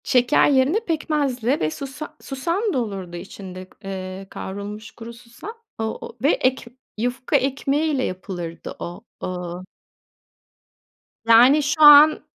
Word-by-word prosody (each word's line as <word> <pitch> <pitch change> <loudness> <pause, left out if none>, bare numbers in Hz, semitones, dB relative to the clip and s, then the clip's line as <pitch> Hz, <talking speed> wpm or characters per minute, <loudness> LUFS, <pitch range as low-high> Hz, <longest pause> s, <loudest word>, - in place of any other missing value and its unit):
Şeker 250 +4 +3
yerine 280 +8 +3
pekmezle 295 - -1
ve 155 - 0
susa 275 - -8
susam 340 - -2
da - - 0
olurdu 195 -6 -5
içinde; 185 0 -9 0.2
eee, 190 0 -6
kavrulmuş 205 +3 -7
kuru 235 0 -10
susam. 235 - -11 0.3
O - - -1 0.2
o 230 - -10
ve 290 - +5
ek 260 +1 0 0.3
yufka 245 +5 -2
ekmeğiyle 275 +1 0
yapılırdı 180 -4 -6
o. 175 +4 -7 0.2
Iıı 180 0 -5 1.6
Yani 245 +6 +6
şu 305 +2 -1
an 295 +1 +9
245 Hz, 120 wpm, -22 LUFS, 195-290 Hz, 1.6 s, an